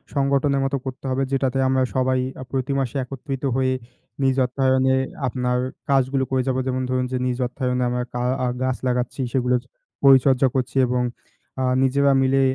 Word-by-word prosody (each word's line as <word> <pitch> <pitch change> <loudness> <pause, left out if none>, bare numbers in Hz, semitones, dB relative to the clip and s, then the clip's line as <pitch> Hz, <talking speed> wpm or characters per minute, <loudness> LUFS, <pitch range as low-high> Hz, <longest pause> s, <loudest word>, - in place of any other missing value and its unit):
সংগঠনের 140 0 +2
মতো 135 +1 0
করতে 130 +1 -6
হবে 130 +1 0
যেটাতে 135 -1 0
আমরা 130 0 +2
সবাই 130 0 +2 0.2
আ - - -5
প্রতি 135 0 -1
মাসে 135 -1 -2
একত্রিত 135 +1 -6
হয়ে 130 0 +1 0.5
নিজ 135 -1 +3
অর্থায়নে 130 0 +2 0.3
আপনার 125 0 -1 0.3
কাজগুলো 135 0 +2
করে 130 - +2
যাব। 130 -1 +1
যেমন 130 0 -1
ধরুন 130 0 0
যে 130 - 0
নিজ 125 -1 -1
অর্থায়নে 125 0 -1
আমরা 125 0 -1
কা 120 - -2 0.2
আ - - +1 0.2
গাছ 130 -1 0
লাগাচ্ছি, 125 +2 -1
সেগুলোর 125 -1 +1 0.4
পরিচর্যা 135 -1 +6
করছি 130 0 -1
এবং 125 0 0 0.6
আ - - +1 0.2
নিজেরা 140 +1 +3
মিলে 135 +1 +3
130 Hz, 165 wpm, -22 LUFS, 125-135 Hz, 0.6 s, পরিচর্যা